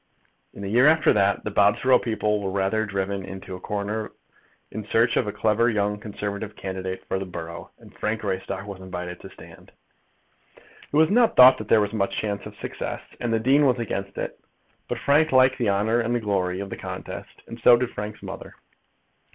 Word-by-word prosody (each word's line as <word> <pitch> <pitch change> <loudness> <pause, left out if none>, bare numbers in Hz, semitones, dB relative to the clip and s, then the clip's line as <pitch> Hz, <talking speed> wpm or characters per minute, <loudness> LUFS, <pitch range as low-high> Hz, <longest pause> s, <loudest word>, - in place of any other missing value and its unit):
In 100 - -8
the - - -4
year 120 +7 +4
after 155 0 +5
that 100 -1 +2
the 105 - -4
Bobsborough 110 +6 +4
people 105 -2 -1
were 95 - -2
rather 100 +3 0
driven 100 0 -2
into 95 0 -8
a - - -9
corner 105 +3 -3 0.6
in 110 - -5
search 115 +2 +2
of - - +1
a - - -1
clever 110 +3 +2
young 105 -2 0
Conservative 105 0 -5
candidate 95 -1 -5
for 95 - -1
the 95 - -4
borough, 85 -1 -7
and - - -17
Frank 110 +1 -2
Greystock 95 -1 -3
was 100 -2 -8
invited 90 -1 -6
to - - -10
stand. - - -15 0.9
It 145 - -8
was 160 +2 +5
not 235 +1 +4
thought 130 +1 +8
that 110 - -7
there 110 - +5
was 105 +1 -2
much 100 -2 -1
chance 100 -2 -3
of - - -12
success, - - -5 0.2
and 120 - -2
the 115 - +2
dean 135 +5 +4
was 125 -1 +2
against 100 -4 -4
it. - - -5 0.5
But - - -3
Frank 150 +3 +3
liked 130 0 +4
the 115 -4 +1
honour 105 +4 +1
and 120 +1 0
glory 95 -4 -1
of 100 - -7
the - - -5
contest, - - -8
and 115 - -10
so 120 +1 +7
did 125 0 -2
Frank's 105 +1 -7
mother. - - -8
105 Hz, 200 wpm, -24 LUFS, 100-115 Hz, 0.9 s, thought